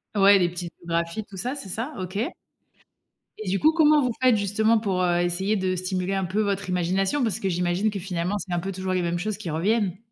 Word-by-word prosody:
Ouais, 200 0 +6
les 175 -1 +2
typographies, 170 +2 -3
tout 195 -1 -12
ça, 250 +8 -3
c'est 245 -9 -8
ça? 235 +11 -4
OK. 185 +2 -5 1.2
Et 215 -4 -5
du 195 - +1
coup, 315 - +5
comment 305 -2 +5
vous 250 - +1
faites, 255 -3 +5
justement, 215 +3 +2
pour, 190 -4 -1
heu, 175 -1 +2
essayer 190 +4 0
de 185 -2 0
stimuler 185 +1 -2
un 195 -1 0
peu 195 +5 0
votre 200 -2 -1
imagination? 190 +9 +1
Parce 220 -2 -1
que, 195 - -2
j'imagine, 180 +4 +1
que 200 - -4
finalement, 180 +1 -2
c'est 185 -3 -5
un 175 - +1
peu 195 +3 -4
toujours 185 0 -3
les 180 - +1
mêmes 175 0 -1
choses 210 +3 -2
qui 200 -6 -6
reviennent. 195 +4 0
195 Hz, 225 wpm, -25 LUFS, 180-215 Hz, 1.2 s, Ouais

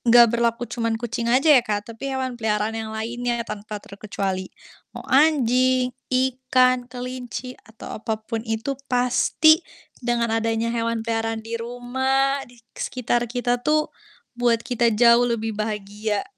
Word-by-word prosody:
enggak 235 -1 +6
berlaku 235 0 +1
cuman 230 -2 -2
kucing 235 0 -3
aja 270 +6 +5
ya, 260 - +7
Kak, 215 -1 -3
tapi 275 +5 -6
hewan 260 -3 -3
peliharaan 215 0 0
yang 225 0 -4
lainnya 235 +2 -3
tanpa 210 -1 -6
terkecuali. 195 -2 -4 0.5
Mau - - -7
anjing, 255 -3 +3 0.2
ikan, 255 -1 +2
kelinci, 250 0 -6 0.2
atau 220 -1 -9
apa 220 -1 -2
pun 225 0 -3
itu 225 +5 -1 0.2
pasti 250 +6 +4 0.4
dengan 235 -2 0
adanya 225 +1 -1
hewan 230 -1 -1
peliharaan 225 -1 -2
di 225 - -8
rumah, 265 +3 0
di 245 - -18 0.2
sekitar 240 -1 -1
kita 245 0 -1
tuh, 305 +3 +1 0.4
buat 240 -2 +1
kita 240 -1 +1
jauh 240 +1 +6
lebih 225 -1 -1
bahagia. 210 0 -3
235 Hz, 140 wpm, -23 LUFS, 225-250 Hz, 0.5 s, ya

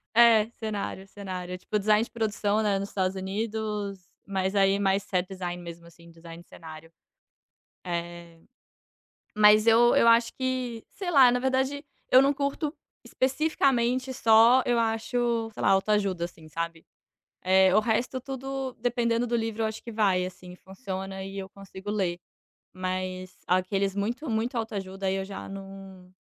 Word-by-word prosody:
É. 230 -2 +6
Cenário. 205 -3 -4
Cenário. 185 -3 -7
É, - - -4
tipo, 210 +3 -2
design 210 +2 +3
de - - -10
produção, 215 -2 0
né, 205 -2 +1
nos 200 +1 -5
Estados 190 -1 -1
Unidos. 205 -1 -4 0.2
Mas, 190 0 -1
aí, 195 0 +3
mais 195 0 +1
set 185 -3 -1
design, 180 -2 -5
mesmo, 170 -1 -10
assim, 170 0 -17
design 165 0 -12
de - - -34
cenário. 160 0 -12 0.9
É. 170 -1 -6 1.0
Mas, 210 0 +6
eu 235 +1 +6
eu - - +4
acho 230 0 +5
que, 255 -3 -3
sei 380 -3 -5
lá, 265 -6 +7
na 250 - +1
verdade, 265 +2 0 0.3
eu 255 - +8
não 275 +1 +3
curto 280 +2 -2 0.3
especificamente 260 -3 0
só, 230 +1 +5
eu 240 -1 +2
acho, 230 0 0
sei - - -7
lá, - - +3
autoajuda, 195 -2 +1
assim, 160 -2 -12
sabe. 165 +1 -5 0.6
Eh, 190 0 +4
o 215 - +6
resto 240 +4 -1
tudo, 270 0 -5
dependendo 240 0 0
do 240 - -2
livro, 225 -1 -2
eu - - +2
acho 220 0 -6
que 235 - -8
vai, 195 -4 +2
assim, 180 0 -11
funciona 190 -1 -7
e 195 +1 -7
eu 190 -1 -6
consigo 195 +1 -9
ler. 185 -5 -1 0.6
Mas, 185 0 -4
aqueles 190 +2 0
muito, 235 +9 -3
muito 230 +3 -1
autoajuda, 195 -4 -4
aí, 190 - +1
eu 195 0 -3
já 195 0 -8
não 195 -1 -11
205 Hz, 160 wpm, -27 LUFS, 185-235 Hz, 1.0 s, eu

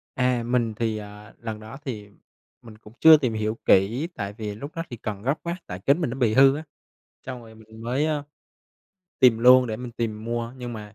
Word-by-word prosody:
À, 125 -2 +1
mình 120 -2 0
thì, 110 0 -1
à, 105 +1 -11
lần 110 -2 -6
đó 110 +5 -10
thì 105 -5 -6 0.5
mình 115 -3 -13
cũng 110 0 -16
chưa 160 -1 +9
tìm 125 -6 -1
hiểu 110 +1 -2
kỹ 115 - +3
tại 100 -2 -4
vì 105 -1 -6
lúc 140 +8 -8
đó 165 - -3
thì 120 - -7
cần 105 -2 -5
gấp 135 - +2
quá, 170 +1 -3
tại 90 0 -6
kính 145 +5 +3
mình 150 - 0
nó 130 - -5
bị 115 -4 +2
hư 135 +2 +6
á. 155 - -5 0.6
Xong 125 -2 -6
rồi 110 -1 -14
mình 110 0 -14
mới, 130 +6 0
a, 150 -2 -1 1.0
tìm 120 -3 +6
luôn 125 +1 +7
để 110 -2 -3
mình 125 0 -7
tìm 110 -2 -4
mua 115 0 -3
nhưng 120 -1 -6
mà 105 -1 -9
115 Hz, 225 wpm, -24 LUFS, 110-130 Hz, 1.0 s, chưa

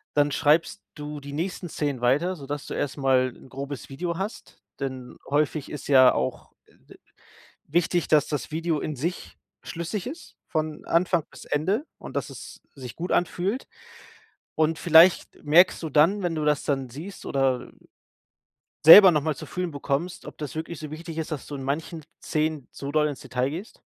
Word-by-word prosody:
Dann 145 0 +3
schreibst 160 +7 +2
du 150 0 -6
die 140 0 -9
nächsten 175 +3 -4
Szenen 145 -5 -3
weiter, 145 +10 +2
so, 140 -5 -11
dass 145 0 -4
du - - -6
erstmal 135 -2 +1
'n - - -16
grobes 140 +1 -6
Video 170 +5 -4
hast. 195 +4 -7 0.2
Denn 130 -2 -5
häufig 145 0 0
ist 150 - -7
ja 130 -3 +7
auch, 65 0 -3
äh, - - -26
d - - -15 0.7
wichtig, 175 +2 +1
dass 150 -2 +4
das 145 -5 -3
Video 160 -1 -1
in 150 - -4
sich 170 +8 -5 0.2
schlüssig 170 +4 -5
ist 310 +7 -9
von 155 -1 -3
Anfang 170 -1 +1
bis - - -13
Ende 195 - 0
und, - - -9
dass - - -2
es - - -10
sich 125 -4 -9
gut 175 +2 -3
anfühlt? 190 +7 0 0.9
Und 160 0 +1
vielleicht 170 +2 +5
merkst 170 +5 +5
du 160 - -4
dann, 160 +8 +3
wenn 175 -3 -1
du 155 - -2
das 150 -1 +1
dann 135 -3 -1
siehst, 165 +10 -9
oder 135 -2 0 1.2
selber 190 +4 +12
noch 155 -3 +2
mal 150 0 -2
zu - - -8
fühlen 180 -2 -4
bekommst, 145 +5 -3
ob - - -10
das 150 -3 -6
wirklich 160 +1 -5
so 155 -1 -7
wichtig 165 +1 -7
ist, 160 - -3
dass 150 - -5
du 145 - -7
in 135 - -7
manchen 160 +4 -3 0.2
Szenen 155 -3 -1
zu 140 - -6
doll 150 0 +3
ins 145 - -6
Detail 125 +1 -2
gehst? 180 +9 -8
155 Hz, 185 wpm, -25 LUFS, 140-170 Hz, 1.2 s, selber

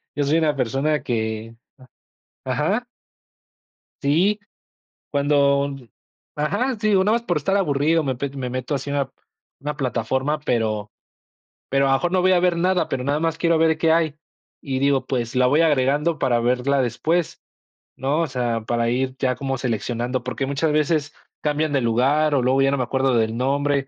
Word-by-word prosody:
yo 145 - 0
soy 145 +3 +2
una 155 -2 +1
persona 135 +3 0
que 110 -2 -3 0.9
¿ajá? 150 - 0 1.2
Sí, 180 +9 +2 0.7
cuando 140 -1 +2 0.7
ajá, 205 - 0
sí, 215 -1 +2
o - - +4
nada 210 - +2
más 235 - -9
por 175 -6 -1
estar 195 +7 +1
aburrido, 160 -2 +2
me 135 -3 -1
pe 140 +3 -3
me 135 -2 -5
meto 130 +3 -3
así 140 +1 -4
a - - -2
una 140 -2 -1 0.5
una 145 +1 -4
plataforma, 130 +3 -1
pero 110 -7 -1 0.8
pero 135 0 +2
a - - +2
lo - - +5
mejor 175 +5 -2
no 185 - +3
voy 185 +1 +4
a 180 - +4
ver 180 -1 +2
nada, 180 +1 +1
pero 130 - -2
nada 140 +2 +1
más 165 -1 0
quiero 170 -1 +2
ver 160 0 +3
qué 160 +1 +3
hay, 160 -3 +2 0.5
y 135 -2 -2
digo, 135 -1 +2
pues 120 -2 -2
la 125 0 +4
voy 145 +5 +3
agregando 150 +1 +2
para 120 -4 +1
verla 125 +3 +1
después, 155 +8 -1 0.5
¿no?, 140 +5 0
o 165 - 0
sea, 120 -4 -2
para 115 +1 -1
ir 130 +2 -1
ya 130 -1 +1
como 135 0 -3
seleccionando, 120 +1 -2
porque 125 +1 -3
muchas 145 +3 0
veces 150 -1 0 0.3
cambian 150 0 0
de 135 - +2
lugar, 135 +6 +2
o 135 - +2
luego 130 +2 +2
ya 135 0 +3
no 140 - 0
me 130 - 0
acuerdo 130 +1 0
del 110 -1 +1
nombre, 140 +2 0
140 Hz, 185 wpm, -22 LUFS, 125-155 Hz, 1.2 s, lo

